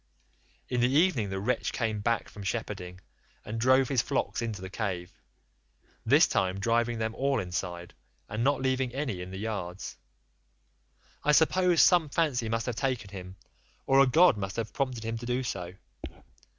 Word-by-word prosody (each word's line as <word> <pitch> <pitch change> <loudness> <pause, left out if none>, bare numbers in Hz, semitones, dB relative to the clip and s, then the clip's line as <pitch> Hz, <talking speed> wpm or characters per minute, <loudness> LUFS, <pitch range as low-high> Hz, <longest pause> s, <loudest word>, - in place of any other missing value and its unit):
In 125 -1 -1
the 125 - +4
evening 140 - +2
the 95 0 -3
wretch 120 +6 -1
came 110 -3 -1
back 115 +2 0
from 105 - -11
shepherding, 95 -4 -4 0.4
and 110 +2 -4
drove 130 +1 +4
his 130 -3 +2
flocks - - -2
into 110 -4 -3
the 95 0 -7
cave—this 90 - -2
time 95 0 0
driving 120 +2 +1
them 110 0 -2
all 135 +1 0
inside, 90 -2 -4 0.3
and 110 +3 -3
not 140 0 +1
leaving 130 -1 0
any 130 -10 -2
in 90 - -7
the 95 - -7
yards; 95 -4 -5 1.3
I 150 - +3
suppose 175 +2 +4
some 175 -5 +4
fancy 140 -7 0
must 115 0 -1
have 125 -3 -3
taken 125 -7 -2
him, 95 -1 -8 0.5
or 135 0 +4
a 135 - +6
god 165 0 +5
must 95 -1 -4
have 115 -2 -4
prompted 130 -5 -2
him 115 0 -3
to 120 - -7
do 125 +1 0
so. 90 -6 -5
115 Hz, 165 wpm, -29 LUFS, 95-130 Hz, 1.3 s, a